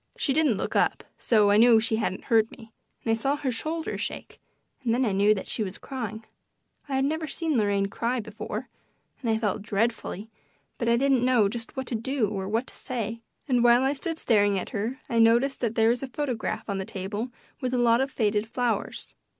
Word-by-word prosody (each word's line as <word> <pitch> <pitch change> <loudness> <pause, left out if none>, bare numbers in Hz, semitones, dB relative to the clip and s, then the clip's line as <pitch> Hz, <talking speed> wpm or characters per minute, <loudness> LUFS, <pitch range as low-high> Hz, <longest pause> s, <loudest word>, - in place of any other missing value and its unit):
She 275 - +1
didn't 295 -8 +3
look - - -3
up, - - +2 0.2
so 210 -3 +4
I 205 - +5
knew 230 0 +7
she 220 0 0
hadn't 200 -4 -2
heard 225 -1 +3
me, 225 -1 -14 0.3
and 225 - +2
I - - +4
saw 270 +6 +1
her 280 -3 -2
shoulders 320 +7 -3
shake, - - -6 0.4
and 230 -2 +2
then 255 +1 +2
I 215 - +1
knew 200 +2 +4
that 195 - -6
she - - -2
was 195 -2 -3
crying. 225 -5 -6 0.6
I 270 - -1
had 265 0 +2
never 315 +2 -1
seen 315 +1 -2
Lorraine 205 -3 +2
cry 235 +5 -1
before, 210 -1 -6 0.5
and 240 - -2
I 220 - +3
felt 210 -2 -1
dreadfully, 220 0 -2 0.5
but 235 - 0
I 235 - +4
didn't 265 -1 +3
know 250 -5 +4
just 230 +5 -6
what 265 - -2
to 245 - -5
do 230 -1 0
or 190 -2 -4
what 225 +4 0
to - - -14
say, 230 -2 -4 0.3
and 250 -3 +3
while 240 +1 +6
I 270 +1 +2
stood 325 +3 -4
staring 205 -7 +3
at 185 - -4
her 225 +4 -3
I 230 - 0
noticed 235 +4 +4
that 230 -2 -1
there 225 0 +4
was 240 +1 +1
a 270 - -3
photograph 245 -5 -3
on 200 -2 -2
the 190 - -3
table 205 +6 -4 0.3
with 255 -2 -2
a 255 - 0
lot 235 0 +4
of 270 - 0
faded 210 -4 0
flowers. 245 -1 -2
230 Hz, 220 wpm, -26 LUFS, 215-255 Hz, 0.6 s, knew